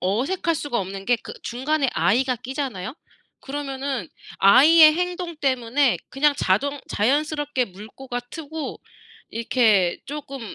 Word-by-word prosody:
어색할 275 - 0
수가 285 -5 -2
없는 195 0 -5
게 245 -1 +3
그 - - -8
중간에 270 +3 -1
아이가 255 +1 +2
끼잖아요. 255 -3 -5 0.5
그러면은 275 -1 -4 0.3
아이의 310 +10 +7
행동 355 -1 -3
때문에 260 -1 +1
그냥 290 +2 +2
자동 280 +10 +1
자연스럽게 290 +3 0
물꼬가 225 +6 -8
트고 315 -1 -6 0.5
이렇게 220 -6 +2
쪼금 275 -6 -7
265 Hz, 285 characters per minute, -23 LUFS, 235-295 Hz, 0.5 s, 아이의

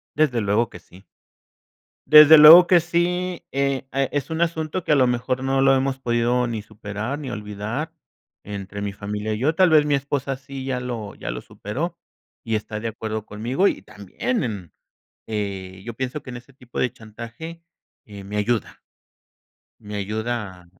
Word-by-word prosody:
Desde 145 -6 +2
luego 105 +3 +1
que 85 - -11
sí. 90 +3 -18 1.0
Desde 150 +1 +9
luego 165 +4 +11
que 175 -1 +5
sí, 175 +1 -1
eh, 135 -1 -1
ah, 135 - +1
es 140 +1 -3
un 160 0 -3
asunto 165 +1 -1
que, - - +1
a - - +7
lo 130 -3 +4
mejor, 125 +1 -1
no 135 0 +1
lo 135 0 +5
hemos 135 0 0
podido 120 0 +1
ni 115 -3 -4
superar, 110 +4 -5
ni 140 -4 -6
olvidar, 105 +6 -5 0.5
entre 100 0 -7
mi 100 0 -3
familia 105 +2 -4
y - - -4
yo, 145 +7 +1
tal 185 +2 +5
vez 155 -2 +6
mi 145 -1 +1
esposa 140 -1 -2
sí 135 0 -8
ya 130 -1 -2
lo 115 -5 -5
ya - - -5
lo - - -5
superó, 160 - -5 0.5
y 115 - -2
está 105 0 -3
de 115 - -3
acuerdo 110 -1 -5
conmigo, 120 - 0
y - - -3
también 105 +5 -3
en, 100 -8 -5 0.5
eh, 95 -3 -5
yo 120 - -5
pienso 130 +4 -4
que - - -14
en 125 - -7
ese 120 +3 -13
tipo 125 -2 -11
de 125 - +1
chantaje, 115 +9 -10 0.4
eh, 100 -5 -11
me 105 +2 -6
ayuda. 110 +1 -1 1.0
Me 105 -1 -9
ayuda 110 +4 -2 0.2
a 90 - -20
120 Hz, 180 wpm, -23 LUFS, 105-140 Hz, 1.0 s, luego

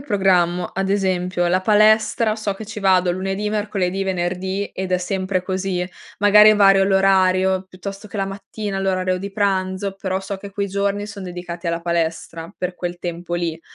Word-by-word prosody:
programmo: 185 -7 +2
ad 195 +1 -3
esempio 185 -2 0
la 185 +1 +2
palestra, 215 +2 +3
so 210 -3 -2
che 220 - -8
ci 215 0 -7
vado 185 -2 +3
lunedì, 195 +3 -2
mercoledì, 195 -3 -1
venerdì 185 +2 -2
ed 185 -1 -4
è 180 - +3
sempre 185 0 -2
così. 185 -1 -2 0.3
Magari 210 +1 +7
vario 195 -1 +5
l'orario 190 -1 +3
piuttosto 195 +3 -8
che 210 - -8
la 195 -1 0
mattina 195 +1 -5
l'orario 185 -1 0
di 200 +1 -6
pranzo, 195 -1 -1
però 190 0 -2
so 195 +1 -5
che 200 +1 -10
quei 200 0 -2
giorni 200 +1 -1
son 200 -2 -8
dedicati 175 -1 -7
alla 170 0 -1
palestra 165 -1 -2
per 180 0 -4
quel 175 0 -4
tempo 175 0 -4
lì. 165 -2 -2
190 Hz, 170 wpm, -21 LUFS, 180-200 Hz, 0.3 s, Magari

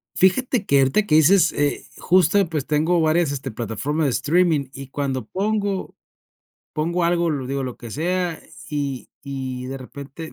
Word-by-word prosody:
Fíjate 215 +4 +2
que, 140 -5 +4
ahorita 135 +11 +3
que 175 - +2
dices, 170 +5 +5
eh, 145 0 -1
justo, 185 +2 +3
pues, 150 -4 -2
tengo 160 +3 +2
varias, 160 -1 +2
este, 135 -1 -4
plataformas 120 +8 -2
de - - +3
streaming, 160 +2 +2
y 135 0 -8
cuando 135 -1 -3
pongo, 200 -1 -2 0.8
pongo 170 +3 0
algo, 170 0 +2 0.2
digo 135 +1 -2
lo 125 -2 -5
que 120 - -10
sea, 175 +4 -1 0.3
y 140 -3 -3 0.2
y 130 -2 -4
de 135 +1 -5
repente, 140 +4 -9
155 Hz, 155 wpm, -22 LUFS, 135-175 Hz, 0.8 s, dices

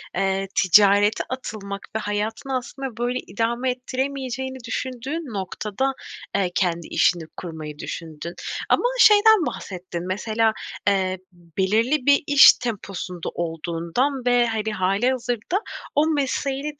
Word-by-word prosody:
eee, 195 +1 0
ticarete 205 +2 +5
atılmak 200 -6 -6
ve - - +1
hayatını 220 +6 -2
aslında 255 -1 -7
böyle 245 +1 -1
idame 235 +4 -1
ettiremeyeceğini 260 0 -3
düşündüğün 260 +4 -4
noktada, 210 +6 -2 0.4
eee, 190 -3 +1
kendi 170 -3 0
işini 175 -2 +2
kurmayı 155 -4 -7
düşündün. 165 +1 -6 0.4
Ama - - +3 0.2
şeyden 420 - +7
bahsettin, 180 -6 -6
mesela, 220 +3 +1 0.3
eee, 190 -2 +2 0.2
belirli 200 - 0
bir 285 0 +5
iş 285 -1 +9
temposunda 195 -6 -5
olduğundan 170 - -2
ve 245 -1 +4
hani 220 -1 -2
hâlihazırda 240 - 0 0.3
o 295 +2 +4
mesleğini 285 -1 -1
220 Hz, 110 wpm, -23 LUFS, 190-260 Hz, 0.4 s, iş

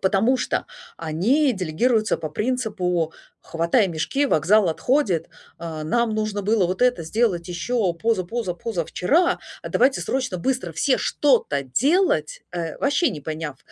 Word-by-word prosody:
Потому 210 +7 +2
что - - -1 0.3
они 220 - +1
делегируются 215 +5 +1
по 155 -2 -6
принципу 180 -6 -1 0.3
"хватай 170 +6 +1
мешки- 185 - -1
вокзал 185 - +3
отходит". 190 - 0 0.3
А 160 -2 -6
нам 235 +6 +1
нужно 215 -1 -1
было 210 -2 +2
вот 185 +2 -3
это 250 -7 +3
сделать 180 0 0
еще 185 +2 0
позапозапозавчера, 220 - 0 0.3
"давайте, 265 +2 +2
срочно, 255 -8 -2
быстро 255 -3 -1
все 255 - +1
что-то 235 - +1
делать!" 360 - +1
Э, 170 -2 -4
вообще 295 +4 +2
не 150 - -6
поняв, 155 -2 -5
200 Hz, 125 wpm, -23 LUFS, 165-250 Hz, 0.3 s, вокзал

